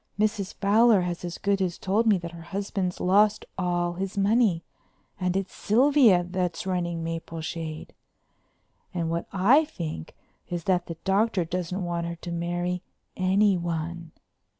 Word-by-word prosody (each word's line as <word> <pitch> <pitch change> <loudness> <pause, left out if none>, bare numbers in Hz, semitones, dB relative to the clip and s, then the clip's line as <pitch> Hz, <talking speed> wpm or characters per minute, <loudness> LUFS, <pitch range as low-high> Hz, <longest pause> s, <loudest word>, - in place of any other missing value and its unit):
Mrs. 210 -2 0
Fowler 210 +1 +4
has 175 -1 -3
as 175 -1 -5
good 200 -1 0
as 180 -2 -1
told 210 +4 +1
me 210 -3 +5
that 170 -1 -6
her 170 -1 -10
husband's 195 +1 -3
lost 205 +3 +3
all 175 -1 0
his 190 +2 -4
money 200 -4 +3 0.6
and 180 0 0
it's 195 -1 -3
Sylvia's 235 -6 +4
that's 180 -2 -2
running 175 -3 -2
Mapleshade. 165 -1 -5 1.0
And 165 -2 -1
what 170 0 -2
I 225 +11 +5
think 165 - -6 0.3
is 175 -1 -3
that 180 -1 +1
the 165 - -6
Doctor 195 -1 +2
doesn't 180 +2 -3
want 170 -1 -2
her 170 - -4
to 170 +1 -8
marry 175 +1 -2 0.3
anyone. 175 -4 0
180 Hz, 145 wpm, -26 LUFS, 170-200 Hz, 1.0 s, me